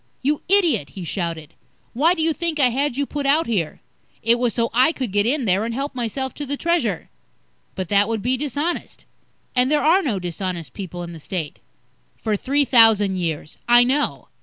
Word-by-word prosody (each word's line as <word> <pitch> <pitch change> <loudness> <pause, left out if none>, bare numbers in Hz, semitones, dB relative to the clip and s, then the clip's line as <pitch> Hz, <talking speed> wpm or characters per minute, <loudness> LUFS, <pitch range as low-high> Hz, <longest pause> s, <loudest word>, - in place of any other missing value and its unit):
"You 295 +2 0
idiot," 330 - +3
he 185 - -5
shouted. 165 -3 -4 0.4
"Why 315 +9 +3
do 320 - -1
you 325 0 +2
think 330 -1 -2
I 255 -3 +5
had 270 +1 -1
you 285 - 0
put 285 0 -3
out 305 +4 +3
here? 185 -9 -2 0.4
It 230 +2 +3
was 245 -1 +1
so 230 +2 -1
I 255 +6 +4
could 255 -9 -4
get 205 +2 +2
in 270 0 0
there 195 +1 +2
and 230 0 -3
help 275 +2 -3
myself 255 +2 -3
to 290 - -6
the 285 +1 -2
Treasure." 275 - -1 0.6
"But 185 -2 -4
that 205 0 +3
would 225 -3 -2
be 250 +2 +1
dishonest. 295 +5 -3 0.5
And 250 +1 +3
there 300 - +2
are 340 +6 +4
no 255 - -1
dishonest 175 -2 -5
people 180 -3 -6
in 170 - -7
the 165 - -10
State." 160 -1 -5 0.6
"For 215 -2 -2
three 280 +7 +1
thousand 220 -6 +5
years. 160 -3 -4
I 240 0 +7
know." 275 +4 -1
240 Hz, 200 wpm, -21 LUFS, 195-285 Hz, 0.6 s, I